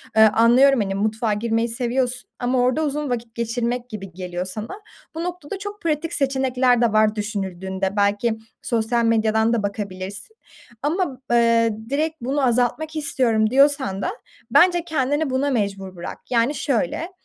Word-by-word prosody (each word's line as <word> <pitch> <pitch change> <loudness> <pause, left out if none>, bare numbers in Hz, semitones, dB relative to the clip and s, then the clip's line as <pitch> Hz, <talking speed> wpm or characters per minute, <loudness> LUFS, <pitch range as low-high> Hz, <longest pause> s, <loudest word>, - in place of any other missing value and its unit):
Eee, 220 - +6
anlıyorum, 235 +4 +5
hani, 195 -1 -2
mutfağa 220 +2 0
girmeyi 225 +2 0
seviyorsun 250 +1 -1
ama 250 +1 +1
orada 255 +5 +2
uzun 295 -1 -2
vakit 235 -2 -4
geçirmek 235 +1 -2
gibi 195 -5 -7
geliyor 180 0 -4
sana. 220 - -6 0.3
Bu 330 - -3
noktada 355 0 -5
çok 410 +1 -7
pratik 325 0 -1
seçenekler 260 -3 +2
de 230 -2 +2
var 215 0 +3
düşünüldüğünde. 190 -2 -3
Belki 205 +3 +1 0.2
sosyal 235 0 0
medyadan 220 0 +2
da 225 - 0
bakabilirsin. 200 - -5 0.5
Ama, 295 -3 -1
eee, 230 -1 +4 0.2
"Direkt 310 +3 0
bunu 270 +3 0
azaltmak 250 +6 0
istiyorum." 235 -7 +1
diyorsan 270 -7 +3
da - - -1 0.4
bence 350 -1 +5
kendini 290 0 0
buna 265 +2 0
mecbur 195 -6 -2
bırak. 175 - -7
Yani, 245 +4 +2
şöyle, 280 - -1
235 Hz, 145 wpm, -22 LUFS, 215-275 Hz, 0.5 s, Eee